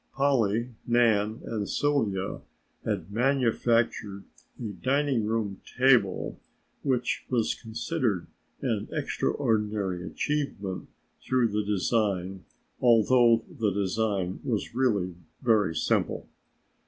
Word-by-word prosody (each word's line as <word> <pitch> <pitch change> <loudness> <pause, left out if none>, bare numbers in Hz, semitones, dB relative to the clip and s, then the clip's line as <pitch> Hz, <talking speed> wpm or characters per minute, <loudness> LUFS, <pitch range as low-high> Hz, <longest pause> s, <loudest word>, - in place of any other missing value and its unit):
Polly, 120 -4 +2 0.2
Nan 115 -2 +3
and 105 -3 -3
Sylvia 110 -10 0 0.4
had - - -3
manufactured 115 -4 +1 0.4
a 115 - -4
dining 130 0 0
room 105 -3 -2 0.2
table 125 -8 +3 0.4
which 130 -3 0
was 120 -3 +1
considered 115 - -2 0.4
an - - -1
extraordinary 105 -5 -1
achievement 105 -7 -3 1.9
although 115 -1 +5
the 110 -3 -1
design 100 -1 -1
was 115 -7 -2
really 105 -8 +1 0.3
very 105 -8 +3
simple. - - 0
115 Hz, 80 wpm, -28 LUFS, 100-125 Hz, 1.9 s, although